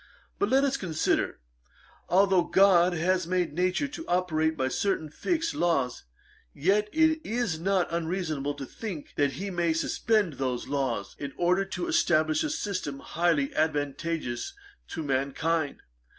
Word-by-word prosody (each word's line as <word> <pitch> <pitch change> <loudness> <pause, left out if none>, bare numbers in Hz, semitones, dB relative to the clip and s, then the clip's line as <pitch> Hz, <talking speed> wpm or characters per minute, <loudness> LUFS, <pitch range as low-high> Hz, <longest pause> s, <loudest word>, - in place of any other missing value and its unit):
But 405 - +1
let 270 +1 +4
us 275 -1 +1
consider; 160 -5 0 0.7
although 190 0 +4
GOD 185 -2 +5
has 180 +1 +1
made 180 -3 0
Nature 185 - +1
to 320 +4 -8
operate 160 -3 +1
by 130 - +1
certain 160 +2 -1
fixed 335 - -1
laws, 140 - 0 0.5
yet 205 +6 +2
it 315 0 +3
is 225 -8 -1
not 190 +1 +1
unreasonable 160 -4 -2
to 140 -1 -6
think 180 - -7
that 145 -2 +1
he 195 +9 -4
may 170 -2 +1
suspend 205 +2 +1
those 125 -2 -2
laws, 130 -8 -2
in 140 -1 -5
order 180 +3 +2
to 195 - -4
establish 165 - +2
a 310 - -1
system 200 - -3
highly 160 -2 0
advantageous 155 - -2 0.3
to 165 - -5
mankind. 145 +3 -1
170 Hz, 140 wpm, -28 LUFS, 150-195 Hz, 0.7 s, GOD